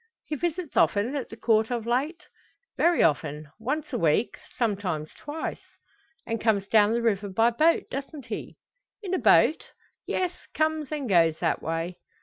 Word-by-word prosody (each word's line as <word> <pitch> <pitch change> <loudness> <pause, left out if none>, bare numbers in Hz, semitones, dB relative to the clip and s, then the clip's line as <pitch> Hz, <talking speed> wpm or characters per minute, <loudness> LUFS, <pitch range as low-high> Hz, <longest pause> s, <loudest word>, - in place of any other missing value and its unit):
"He 305 - -3
visits 340 +1 -3
often 215 +7 +2
at 275 - -3
the 225 - -10
Court 220 -1 +2
of 240 -3 -2
late?" 290 +9 -1 0.5
"Very 345 0 +3
often 150 -1 0
once 290 +6 -3
a 240 - 0
week, 165 +7 +1 0.2
sometimes 190 -9 -1
twice." 300 +2 -5 0.6
"And 230 -1 -3
comes 205 -3 +1
down 210 0 +4
the 235 0 0
river 205 -3 +1
by 225 +5 +3
boat; 315 +8 +3
doesn't 275 0 -6
he!" - - -6 0.5
"In 380 -2 -3
a 370 - +2
boat. 315 - +4 0.3
Yes 365 -2 0 0.2
comes 310 -2 0
and 295 -4 -3
goes 165 -5 +4
that 165 - 0
way." 165 +2 -3
235 Hz, 160 wpm, -26 LUFS, 200-300 Hz, 0.6 s, down